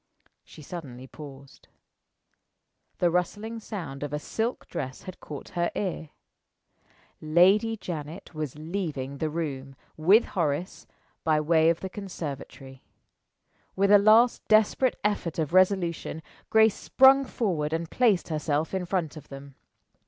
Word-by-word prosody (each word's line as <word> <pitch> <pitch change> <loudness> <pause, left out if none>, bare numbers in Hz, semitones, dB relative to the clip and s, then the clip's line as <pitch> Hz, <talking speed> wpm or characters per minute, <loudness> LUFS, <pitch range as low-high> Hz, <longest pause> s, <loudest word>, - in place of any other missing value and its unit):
She 155 - -14
suddenly 135 -6 -8
paused. 140 -1 -13 1.3
The 175 -1 +2
rustling 205 +6 -2
sound 165 -12 -7
of 145 -1 -4
a - - 0
silk 225 - -3
dress 130 -3 -6
had 185 - -9
caught 145 -2 -9
her 175 -1 -1
ear. 175 -6 -3 1.1
Lady 190 +8 +4
Janet 165 -2 -7
was 155 -4 -5
leaving 155 -5 -4
the 155 - -1
room, 140 -4 -5 0.2
with 190 +9 +5
Horace, 170 -1 -3 0.4
by 155 -1 +2
way 160 +1 +3
of 170 - 0
the 190 - -3
conservatory. 145 -8 -8 0.9
With 195 +1 +2
a 205 - +8
last 220 +4 +5
desperate 220 +4 +3
effort 205 -6 -1
of 160 0 -2
resolution, 185 -4 +1 0.3
Grace 220 -1 +5
sprung 270 +4 +5
forward 175 - -2
and 165 +1 -3
placed 220 -10 +2
herself 155 0 -1
in 190 -1 -2
front 175 -4 -2
of 155 - -11
them. 140 0 -10
170 Hz, 130 wpm, -27 LUFS, 150-200 Hz, 1.3 s, a